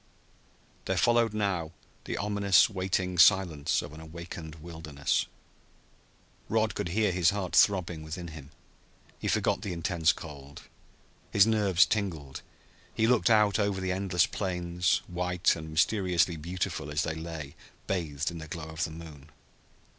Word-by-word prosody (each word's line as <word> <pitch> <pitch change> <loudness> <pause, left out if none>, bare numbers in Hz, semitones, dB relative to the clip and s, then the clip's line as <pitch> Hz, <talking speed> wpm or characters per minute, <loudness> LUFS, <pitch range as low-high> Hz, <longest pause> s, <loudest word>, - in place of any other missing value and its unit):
There 95 - -1
followed 115 +4 +3
now 95 -6 -2 0.3
the - - -3
ominous, 100 -4 +4
waiting 95 -2 -1
silence 85 -6 +4
of - - -9
an 80 - -10
awakened 80 0 -8
wilderness. 80 -3 -2 1.2
Rod 110 0 +1
could 105 -4 -3
hear 105 +2 +1
his 90 -2 +3
heart 100 -3 -2
throbbing 90 -5 +3
within 85 +3 -6
him. 75 -3 -11 0.7
He - - -4
forgot - - +1
the 95 - -4
intense 85 -1 +1
cold. 70 -3 -10 0.7
His 100 -1 +5
nerves 100 -5 +4
tingled. 80 -10 -3 0.5
He 110 - +1
looked 120 0 +3
out 105 -2 +4
over 100 -2 0
the 95 0 -2
endless 90 -2 +2
plains, 90 -2 -1
white 90 0 0
and 80 -1 -8
mysteriously 90 0 +2
beautiful 85 -2 -4
as 75 +3 0
they 80 - -2
lay 80 -3 -7 0.3
bathed 80 -5 -2
in 85 - -7
the 80 - -8
glow 80 0 -7
of 80 +1 -2
the - - -6
moon. 80 -3 -11
85 Hz, 145 wpm, -29 LUFS, 80-95 Hz, 1.2 s, His